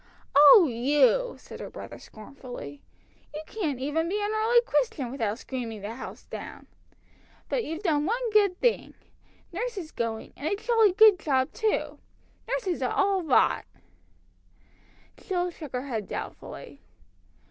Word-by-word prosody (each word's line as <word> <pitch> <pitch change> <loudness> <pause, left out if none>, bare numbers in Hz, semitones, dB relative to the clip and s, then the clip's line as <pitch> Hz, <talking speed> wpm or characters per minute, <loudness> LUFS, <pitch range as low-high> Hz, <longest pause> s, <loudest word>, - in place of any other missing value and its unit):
"Oh, 295 +5 +9
you!" 295 - +2
said - - -12
her - - -7
brother - - -9
scornfully. 215 - -10 0.5
"You 305 - -5
can't 315 - -3
even 310 +5 -1
be 410 +3 -1
an 415 0 -1
early 450 +2 +4
Christian 445 - -1
without 225 -5 -2
screaming 235 -5 -6
the 205 +3 -5
house 255 - -9
down! - - -9 0.8
But - - 0
you've 325 +3 -6
done 300 -4 +1
one 470 +2 -1
good 405 -4 +3
thing! 485 -2 0 0.6
Nurse 465 +5 -3
is 330 -5 -6
going, 225 -1 -4
and 290 - -5
a 400 - +1
jolly 440 -2 +3
good 425 -2 +7
job 265 -4 0
too! 440 -2 -1 0.5
Nurses 370 - -2
are 255 - 0
all 390 -1 +2
rot!" 310 -6 +2 1.5
Jill 360 -2 -2
shook 305 -5 -10
her 250 +2 -3
head 225 -7 -4
doubtfully. - - -8
325 Hz, 145 wpm, -27 LUFS, 260-430 Hz, 1.5 s, Oh